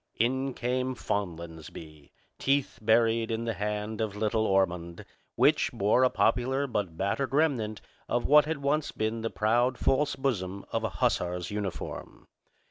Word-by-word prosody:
In 130 +3 0
came 125 +1 -1
Fonlansbee, 80 -7 -5 0.3
teeth 135 -4 0
buried 115 +1 +3
in 115 0 -2
the 115 - -1
hand 105 +1 -3
of 105 -2 -2
little 110 +1 0
Ormond, 90 -3 0 0.3
which - - +3
bore 105 +6 +2
a 130 - +5
popular 125 +6 +1
but 100 -10 -3
battered 110 +9 -1
remnant 125 -9 +1 0.3
of 120 - 0
what 150 +1 +6
had 150 -2 -3
once 150 +2 +1
been 110 +1 -2
the 115 - -2
proud 120 +4 +1
false 145 +2 +1
bosom 100 -8 -2
of - - -1
a - - 0
hussar's 90 +1 -1
uniform. 100 -3 -5
110 Hz, 145 wpm, -28 LUFS, 100-130 Hz, 0.3 s, what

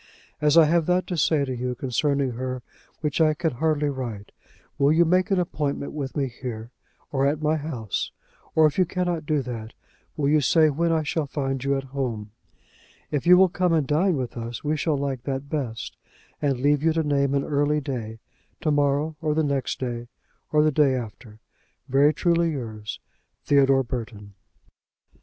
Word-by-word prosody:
As 150 +1 +4
I 165 - +9
have 165 +1 +2
that 180 +1 +2
to 180 - -3
say 150 -2 +2
to 130 -1 -4
you 125 +1 -3
concerning 135 +1 0
her 130 +1 -4 0.4
which 150 0 0
I 155 -1 +4
can 160 +1 0
hardly 150 +2 0
write, 120 -7 -5 0.5
will 140 +1 +4
you 170 +2 +5
make 185 +4 +2
an 195 -2 +2
appointment 145 -5 -2
with 140 -2 -4
me 140 -2 +1
here, 120 -2 -7 0.4
or 135 -1 +2
at 145 +1 0
my 155 0 +1
house? 135 -10 -3 0.4
Or, 160 - +6
if 155 +4 +1
you 185 - +5
cannot 175 -3 -2
do 150 -3 +1
that, 115 -3 -6 0.4
will 145 -2 +1
you 150 +1 +4
say 155 +2 +4
when 165 +4 0
I 160 -1 +1
shall 150 0 -1
find 135 -2 -2
you 140 0 +1
at 135 - -4
home? 115 -6 -3 0.8
If 145 +3 -1
you 180 0 +9
will 190 +1 +6
come 180 0 0
and 155 -3 +2
dine 160 +5 +2
with 125 -2 -4
us 115 0 -5
we 150 +1 0
shall 155 -1 0
like 135 -3 -2
that 135 0 -4
best, 120 -7 -4 0.5
and 140 -4 0
leave 145 +1 +3
you 160 +1 +2
to 160 0 +1
name 140 -2 +1
an 140 - +1
early 145 +1 +1
day: 120 -6 -5 0.4
to 155 -3 +1
morrow, 145 +2 +1
or 150 -1 0
the 160 - +2
next 140 -3 -1
day, 120 -2 -4 0.4
or 150 0 +4
the 155 - +3
day 140 -2 +3
after. 110 -2 -7 0.5
Very 140 +3 +4
truly 170 +1 +2
yours, 110 -5 -6 0.5
THEODORE 135 -1 +4
BURTON. 110 -5 -6
140 Hz, 190 wpm, -25 LUFS, 130-155 Hz, 0.8 s, I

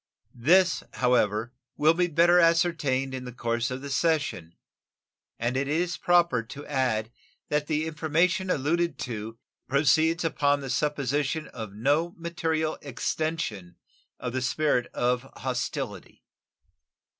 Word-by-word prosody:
This, 170 +8 +4
however, 120 -2 +1 0.2
will 155 +2 +5
be 175 +1 +1
better 170 +2 +5
ascertained 165 -6 +2
in 130 -1 -5
the 125 - -6
course 120 0 -1
of 130 +1 -5
the 140 - -6
session, 140 - 0 0.8
and 120 +2 -1
it 135 +1 0
is 170 +4 0
proper 170 -8 +3
to 140 +5 -10
add 125 -6 -1 0.4
that 150 0 0
the 155 0 0
information 165 +4 0
alluded 170 +3 0
to 115 -1 -5 0.3
proceeds 160 +5 +3
upon 145 -3 +1
the 135 -2 -4
supposition 150 +1 -1
of 110 -3 -7
no 145 +10 +1
material 165 -2 -2
extension 130 - -3 0.4
of 125 -1 -4
the 130 - -1
spirit 130 -1 +1
of 125 +2 -1
hostility. 130 -1 -4
145 Hz, 125 wpm, -27 LUFS, 125-165 Hz, 0.8 s, will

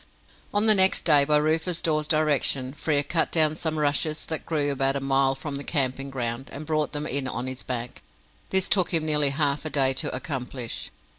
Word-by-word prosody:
On 205 +1 +2
the 215 - +9
next 190 -2 +4
day, 145 -4 +5
by 150 +1 +3
Rufus 160 +3 0
Dawes's 155 -2 0
direction, 145 -4 +1
Frere 150 -1 0
cut 165 +2 -1
down 155 -2 +3
some 155 -1 -2
rushes 150 +1 0
that 160 - -5
grew 145 -3 0
about 135 0 +1
a - - 0
mile 135 0 +1
from 140 +1 -6
the 140 - -6
camping 135 -2 -2
ground, 125 -1 -4
and 145 +3 -7
brought 155 -1 -1
them 150 0 -3
in 140 -2 -2
on 125 -1 -4
his 130 0 -6
back. 125 -1 -6 0.5
This 190 -1 +2
took 185 -4 +1
him 160 -1 0
nearly 150 -2 +2
half 140 0 -1
a 155 - -3
day 135 -3 +2
to 130 - -2
accomplish. 130 -3 -5
145 Hz, 205 wpm, -25 LUFS, 135-155 Hz, 0.5 s, the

